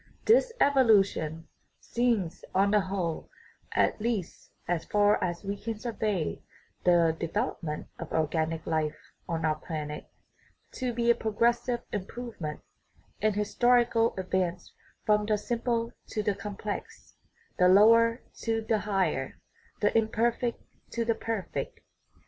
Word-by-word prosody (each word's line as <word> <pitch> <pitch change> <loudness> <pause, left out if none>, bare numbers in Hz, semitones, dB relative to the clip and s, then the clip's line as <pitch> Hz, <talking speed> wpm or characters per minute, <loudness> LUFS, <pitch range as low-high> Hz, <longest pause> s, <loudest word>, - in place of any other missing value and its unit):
This 470 +2 +5
evolution 200 - +3 0.3
seems 220 -8 0
on 200 +1 +4
the 210 - +5
whole 185 -4 -3 0.4
at - - +1
least 220 -6 -3 0.2
as 175 -2 0
far 205 -1 +3
as 175 0 -2
we 200 0 -2
can 225 +1 -5
survey 215 -7 -2 0.4
the 170 -2 +4
development 160 -1 -2
of - - -7
organic 160 0 0
life 155 -2 -1 0.3
on 165 -1 -1
our 155 -1 +1
planet 150 -2 -5 0.6
to 255 -1 -2
be 235 0 +3
a - - +3
progressive 235 +2 +1
improvement, 205 -6 -5 0.6
an 215 0 +3
historical 235 +2 +3
advance 185 -1 -2 0.3
from 210 -1 +3
the 215 -1 +2
simple 235 +1 -1 0.2
to 215 - -2
the 205 - +1
complex, 205 +1 -6 0.5
the 180 - +6
lower 230 +5 +6 0.2
to 225 -1 -1
the 220 0 +1
higher, 190 -10 -1 0.4
the 205 +1 +2
imperfect 230 +2 +1 0.3
to 230 -1 -1
the 230 - +2
perfect. 225 - -4
210 Hz, 125 wpm, -29 LUFS, 175-230 Hz, 0.6 s, the